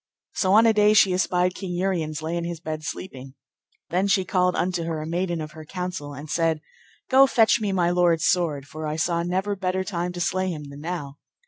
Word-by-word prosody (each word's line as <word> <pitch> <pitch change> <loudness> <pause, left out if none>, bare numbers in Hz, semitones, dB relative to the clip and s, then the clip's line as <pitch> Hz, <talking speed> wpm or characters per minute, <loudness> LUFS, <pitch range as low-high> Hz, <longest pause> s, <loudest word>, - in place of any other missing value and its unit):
So 190 -1 +1
on 220 +2 +7
a 225 - +5
day 210 0 +4
she 195 -3 +5
espied 180 0 +1
King 185 -2 -6
Uriens 165 -4 -2
lay 165 +2 -2
in 170 - -2
his 170 -1 -4
bed 155 -2 -5
sleeping. 135 -4 -7 0.6
Then 185 +3 +1
she 195 -2 +2
called 180 0 +1
unto 180 -2 -1
her 165 -1 -3
a 155 - -5
maiden 175 +1 -2
of 155 -1 -6
her 160 -1 -10
counsel, 180 -3 -5
and 145 +3 -8
said, 160 0 +1 0.5
Go 270 +1 +6
fetch 225 -3 +3
me 205 -2 0
my 175 -2 +2
lord's 175 -3 +2
sword, 155 -6 +1
for 155 +1 -6
I 150 - -2
saw 170 +2 0
never 190 +4 -1
better 190 -1 -1
time 180 -2 -3
to 175 - -6
slay 185 +2 0
him 150 -4 -6
than 140 +1 -10
now. 150 -4 -5
175 Hz, 220 wpm, -24 LUFS, 155-185 Hz, 0.6 s, on